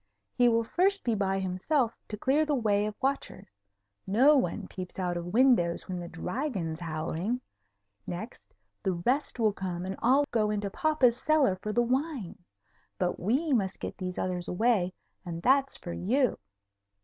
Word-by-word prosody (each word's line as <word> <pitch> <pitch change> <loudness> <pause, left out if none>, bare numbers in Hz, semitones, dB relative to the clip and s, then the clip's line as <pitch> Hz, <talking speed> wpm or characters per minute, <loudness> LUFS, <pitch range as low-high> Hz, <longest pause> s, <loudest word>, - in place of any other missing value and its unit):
He 245 -1 +4
will 230 0 +2
first 385 - +1
be 235 - +1
by 195 -2 0
himself 195 +7 0
to 210 - -5
clear 275 +8 +2
the 300 -1 0
way 210 -4 +1
of 215 - -5
watchers. 270 - -3 0.5
No 255 +10 +5
one 215 -11 0
peeps 185 -1 -8
out 180 -2 -1
of 175 0 -4
windows 215 -5 +3
when 185 -2 -4
the 175 - -6
Dragon's 180 - -3
howling. 170 +7 -2 0.7
Next, 180 +7 -6 0.4
the 190 - 0
rest 250 +11 -1
will 215 -3 +3
come 180 -2 -4
and 190 +1 -3
all 265 +5 +4
go 215 -3 +2
into 205 -1 -2
papa's 265 -3 +2
cellar 300 -11 +3
for 210 +3 -5
the 240 +3 +2
wine. 255 - -2 0.5
But 180 -1 -1
we 260 - 0
must 195 -6 0
get - - -6
these 180 -1 -4
others 180 -1 -2
away, 200 -2 +2 0.3
and 170 -2 -6
that's 275 +1 +3
for 175 - -7
you." 250 +7 +1
210 Hz, 165 wpm, -29 LUFS, 180-260 Hz, 0.7 s, No